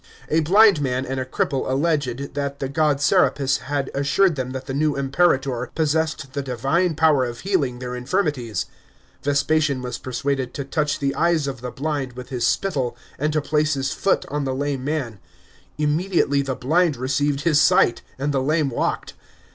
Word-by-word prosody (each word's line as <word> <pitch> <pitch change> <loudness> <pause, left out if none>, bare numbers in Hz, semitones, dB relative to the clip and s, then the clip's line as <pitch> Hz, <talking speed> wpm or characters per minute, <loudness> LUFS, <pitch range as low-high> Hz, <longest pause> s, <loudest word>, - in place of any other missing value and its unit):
A 160 - +3
blind 195 +1 +5
man 130 -1 -1
and 130 0 -3
a 130 - -2
cripple 130 +1 -1
alleged 140 -2 -1
that 140 0 -3
the 135 - -3
god 150 0 +1
Serapis 140 -4 +2
had 140 0 -3
assured 145 +6 +2
them 130 -2 -3
that 130 0 -6
the 135 - -5
new 150 +1 +1
Imperator 135 -3 +1
possessed 155 -3 -1
the 140 - -2
divine 140 +7 0
power 155 -4 +4
of 120 -1 -6
healing 155 -11 0
their 125 0 -5
infirmities. 125 - -1 0.6
Vespasian 145 -1 +1
was 125 - -4
persuaded 130 0 -2
to 140 - -4
touch 150 +1 -1
the 140 -1 -1
eyes 170 -3 +1
of 135 -3 -5
the 125 - -4
blind 140 -2 -3
with 125 0 -9
his 120 -3 0
spittle, 140 -11 -1 0.2
and 150 +2 0
to 155 0 +1
place 150 0 +1
his 135 -1 -2
foot 195 - +1
on 145 0 -2
the 130 -1 -2
lame 140 -1 -2
man; 135 -8 -3 0.6
immediately 150 -1 +1
the 135 -1 -3
blind 160 +3 +1
r 125 - -7
ceived 140 +2 0
his 150 -2 +3
sight 120 - +4 0.2
and 140 +2 -1
the 135 - +1
lame 150 +1 +1
walked. - - -2
140 Hz, 180 wpm, -22 LUFS, 130-155 Hz, 0.6 s, blind